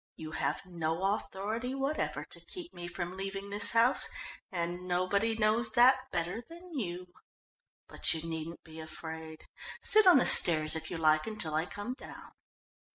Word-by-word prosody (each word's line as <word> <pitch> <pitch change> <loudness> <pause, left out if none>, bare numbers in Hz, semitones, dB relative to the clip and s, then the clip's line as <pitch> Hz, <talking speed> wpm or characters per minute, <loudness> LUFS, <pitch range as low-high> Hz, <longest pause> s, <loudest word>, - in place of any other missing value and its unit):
"You 155 0 -8
have - - -2
no 175 +2 -1
authority 220 +6 -4
whatever 275 +3 -2
to - - -12
keep 350 -2 -9
me 175 0 -7
from 175 +1 -5
leaving 195 +1 -5
this 205 +2 +3
house 230 +3 +5 0.4
and 175 0 -4
nobody 200 +5 0
knows 220 +1 +2
that 255 +2 +4
better 180 +7 -2
than 340 +7 -13
you. 180 - -5 0.7
But - - +1
you 165 0 -2
needn't 165 +1 -6
be 160 0 -12
afraid. 160 0 -8 0.4
Sit 430 -2 +5
on 360 - +8
the 255 - +3
stairs 155 -2 +5
if 160 0 -5
you 175 - -4
like 155 +1 +2
until 215 -8 -1
I 160 +3 0
come 205 +5 -6
down." 260 - -12
185 Hz, 160 wpm, -31 LUFS, 165-230 Hz, 0.7 s, on